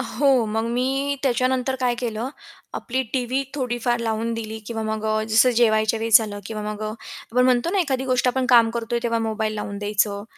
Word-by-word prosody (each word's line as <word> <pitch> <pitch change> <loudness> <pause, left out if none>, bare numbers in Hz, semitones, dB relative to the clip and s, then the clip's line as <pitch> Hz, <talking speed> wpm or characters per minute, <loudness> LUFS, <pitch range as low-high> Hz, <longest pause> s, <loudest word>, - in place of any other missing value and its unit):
हो, 260 0 +2
मग 220 +1 -1
मी 270 +3 0
त्याच्यानंतर 255 0 +1
काय 250 -1 +1
केलं, 235 0 -3 0.5
आपली 260 +2 -2
टीव्ही 260 +1 0
थोडीफार 240 -3 -1
लावून 225 0 -1
दिली 220 -1 -5
किंवा 225 -1 -4
मग 220 0 -3
अ, 215 0 +1
जसं 225 +3 +5
जेवायच्या 220 -1 +3
वेळेस 225 -1 +6
झालं 210 -2 -5
किंवा 215 -1 -5
मग 210 0 -5
अ, 215 - -2 0.4
आपण 250 +1 +3
म्हणतो 255 +5 +2
ना, 400 - 0
एखादी 265 -6 -1
गोष्ट 255 -1 +1
आपण 260 0 0
काम 235 -3 +6
करतोय 235 0 -2
तेव्हा 230 -1 0
मोबाईल 220 -1 -2
लावून 205 -1 -5
द्यायचं. 205 0 0
235 Hz, 190 wpm, -23 LUFS, 220-255 Hz, 0.5 s, वेळेस